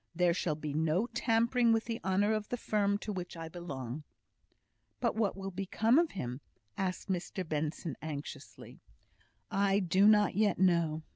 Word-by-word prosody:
There 180 -1 +3
shall 165 -3 -1
be 150 -1 -5
no 160 +7 +1
tampering 235 +1 +3
with 225 0 +2
the 230 -1 -4
honour 200 +3 +2
of 215 -1 -2
the 245 - -2
firm 205 -3 +1
to 210 0 -5
which 180 -2 -6
I 165 0 -5
belong." 145 -5 -6 1.0
"But 235 -4 0
what 210 -3 0
will 195 0 -5
become 210 - +2
of 340 -1 +1
him?" 125 -7 -5 0.3
asked 185 -1 -3
Mr 185 0 -3
Benson, 155 0 -2
anxiously. 150 -2 -8 0.7
"I 195 0 +2
do 190 +1 +4
not 210 -2 +5
yet 205 0 +2
know. 170 -4 +2
190 Hz, 160 wpm, -32 LUFS, 160-215 Hz, 1.0 s, not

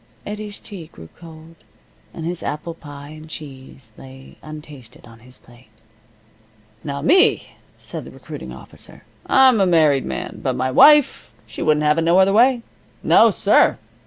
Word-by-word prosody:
Eddie's 210 0 -7
tea 185 -7 -9
grew 80 - -15
cold, 160 -1 -14 0.6
and 160 - -8
his 175 0 -5
apple 155 +3 -5
pie 145 -3 -12
and 155 +1 -13
cheese 135 -6 -11
lay 130 0 -14
untasted 150 -6 -13
on 115 -1 -16
his 125 +2 -10
plate. 120 0 -21 1.2
"Now 140 -1 -5
me," 365 +6 +3 0.3
said - - -8
the - - -11
recruiting - - -10
officer, - - -13 0.2
"I'm 260 -5 +4
a 190 - +3
married 155 -6 +2
man. - - -6
But 130 -2 -2
my 130 +1 -2
wife, 295 - +4
she - - -9
wouldn't 150 0 +1
have 150 +2 +2
it - - 0
no 170 +2 +2
other 190 +1 +4
way. 240 +2 +3 0.4
No, - - +5
sir! - - +2
155 Hz, 160 wpm, -19 LUFS, 135-190 Hz, 1.2 s, No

